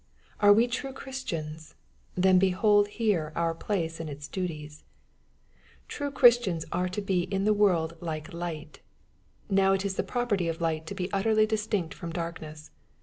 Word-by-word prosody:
Are 205 Hz, 0 st, +7 dB
we 225 Hz, +3 st, +6 dB
true 265 Hz, +3 st, -4 dB
Christians? 165 Hz, -, -6 dB, 0.4 s
Then 185 Hz, 0 st, +5 dB
behold^here 205 Hz, -2 st, +2 dB
our 165 Hz, -1 st, 0 dB
place 165 Hz, -2 st, -3 dB
and 165 Hz, -1 st, -5 dB
its 145 Hz, +1 st, -7 dB
duties! 155 Hz, -5 st, -5 dB, 1.0 s
True 285 Hz, -1 st, -3 dB
Christians 240 Hz, -, +4 dB
are 180 Hz, 0 st, 0 dB
to 200 Hz, +3 st, -4 dB
be 185 Hz, -3 st, +1 dB
in 195 Hz, -1 st, -2 dB
the 215 Hz, -, +4 dB
world 175 Hz, -6 st, +2 dB
like 160 Hz, 0 st, -5 dB
light. 165 Hz, -3 st, -6 dB, 0.7 s
Now 195 Hz, -1 st, +3 dB
it 195 Hz, +1 st, -1 dB
is 190 Hz, -1 st, -2 dB
the -, -, +2 dB
property 225 Hz, -8 st, -1 dB
of 165 Hz, 0 st, -3 dB
light 160 Hz, -1 st, -1 dB
to 200 Hz, -, -5 dB
be 185 Hz, 0 st, -4 dB
utterly 215 Hz, +2 st, +3 dB
distinct 210 Hz, -5 st, -1 dB
from 170 Hz, -, -7 dB
dark 170 Hz, 0 st, -4 dB
ness. 155 Hz, -1 st, -10 dB
185 Hz, 160 wpm, -28 LUFS, 165-205 Hz, 1.0 s, Are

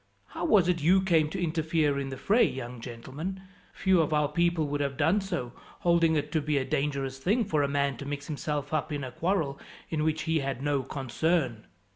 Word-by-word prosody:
"How -, -, -4 dB
was 195 Hz, -6 st, +5 dB
it 175 Hz, -3 st, +1 dB
you 185 Hz, +5 st, +4 dB
came 165 Hz, -5 st, +3 dB
to 190 Hz, -, -4 dB
interfere 160 Hz, -3 st, +1 dB
in 135 Hz, -1 st, -3 dB
the 135 Hz, -, -6 dB
fray, 220 Hz, -, +3 dB
young 125 Hz, -2 st, -3 dB
gentleman? 135 Hz, +11 st, -6 dB, 0.3 s
Few 190 Hz, -3 st, +3 dB
of 155 Hz, -1 st, 0 dB
our 150 Hz, -1 st, +2 dB
people 170 Hz, 0 st, +1 dB
would 145 Hz, 0 st, -2 dB
have 140 Hz, -2 st, -2 dB
done 165 Hz, +7 st, +3 dB
so, 170 Hz, -11 st, -4 dB, 0.3 s
holding 170 Hz, -2 st, +3 dB
it 150 Hz, 0 st, -1 dB
to 155 Hz, -, +1 dB
be 150 Hz, 0 st, 0 dB
a 130 Hz, -, 0 dB
dangerous 135 Hz, -1 st, -2 dB
thing, 210 Hz, -, +1 dB
for 155 Hz, -7 st, +1 dB
a 140 Hz, -, +2 dB
man 140 Hz, -2 st, 0 dB
to 140 Hz, -, -7 dB
mix 140 Hz, 0 st, -4 dB
himself 150 Hz, -1 st, -3 dB
up 155 Hz, 0 st, -1 dB
in 145 Hz, -2 st, -3 dB
a 130 Hz, -, -5 dB
quarrel 160 Hz, -2 st, -1 dB, 0.3 s
in 155 Hz, -2 st, 0 dB
which 155 Hz, 0 st, 0 dB
he 160 Hz, -1 st, +1 dB
had 135 Hz, -2 st, -3 dB
no 145 Hz, -2 st, +1 dB
concern." 135 Hz, -2 st, -1 dB
150 Hz, 215 wpm, -28 LUFS, 140-170 Hz, 0.3 s, was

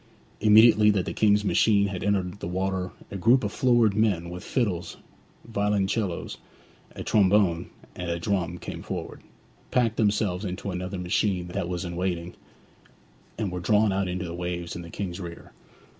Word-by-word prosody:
Immediately 105 Hz, 0 st, +6 dB
that 100 Hz, -4 st, +1 dB
the -, -, -4 dB
King's 105 Hz, -1 st, +3 dB
machine 100 Hz, 0 st, +3 dB
had 95 Hz, -2 st, -5 dB
entered 100 Hz, -1 st, -1 dB
the -, -, -5 dB
water 95 Hz, +1 st, -2 dB, 0.2 s
a 100 Hz, -, -4 dB
group 120 Hz, +7 st, +4 dB
of 105 Hz, -, -1 dB
florid 120 Hz, -4 st, +3 dB
men 100 Hz, -5 st, +1 dB
with 90 Hz, +1 st, -7 dB
fiddles, 90 Hz, -9 st, -2 dB, 0.5 s
violoncellos, 100 Hz, -3 st, -1 dB, 0.6 s
a -, -, -6 dB
trombone, 95 Hz, -4 st, +3 dB, 0.3 s
and 90 Hz, -1 st, -5 dB
a 85 Hz, -, -1 dB
drum, 90 Hz, -1 st, -1 dB
came -, -, -7 dB
forward, -, -, -6 dB, 0.5 s
packed 115 Hz, -3 st, +1 dB
themselves 105 Hz, -3 st, +1 dB
into 95 Hz, 0 st, -4 dB
another 90 Hz, +1 st, -4 dB
machine 90 Hz, 0 st, 0 dB
that 85 Hz, 0 st, -3 dB
was 90 Hz, +1 st, -3 dB
in 85 Hz, 0 st, -5 dB
waiting, 90 Hz, -1 st, -2 dB, 1.0 s
and 105 Hz, -4 st, -2 dB
were 90 Hz, -, -4 dB
drawn 105 Hz, +2 st, +3 dB
out 95 Hz, 0 st, 0 dB
into 90 Hz, 0 st, -3 dB
the 85 Hz, -, -6 dB
waves 85 Hz, -1 st, -4 dB
in 85 Hz, -, -5 dB
the 85 Hz, -, -10 dB
King's 90 Hz, 0 st, -5 dB
rear. 85 Hz, -2 st, -9 dB
95 Hz, 165 wpm, -26 LUFS, 90-105 Hz, 1.0 s, Immediately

